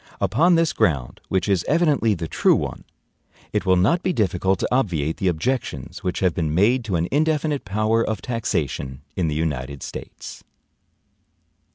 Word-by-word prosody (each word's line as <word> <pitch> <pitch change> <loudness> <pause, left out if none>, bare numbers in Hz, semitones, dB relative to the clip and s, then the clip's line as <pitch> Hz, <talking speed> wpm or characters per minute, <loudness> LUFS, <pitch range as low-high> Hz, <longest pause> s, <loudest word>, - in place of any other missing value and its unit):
Upon 170 +9 +3
this 165 -1 +2
ground, 70 -8 0
which 95 +2 0
is 95 -4 +2
evidently 145 -9 +2
the 80 -2 -4
true - - +3
one, - - -4 0.7
it 95 - -1
will 95 - +5
not 105 - +3
be 185 - 0
difficult 95 - +1
to - - -1
obviate 85 - 0
the 95 - -1
objections 90 - -2
which 90 - -2
have 90 -3 +2
been 80 -2 -1
made 115 +7 +3
to 100 -4 -1
an 85 +1 0
indefinite 150 -1 +1
power 110 +3 +1
of 110 -1 -2
taxation 70 - -3
in 90 -3 0
the 75 - -1
United 70 -4 -3
States. - - -8
95 Hz, 165 wpm, -22 LUFS, 80-125 Hz, 0.7 s, will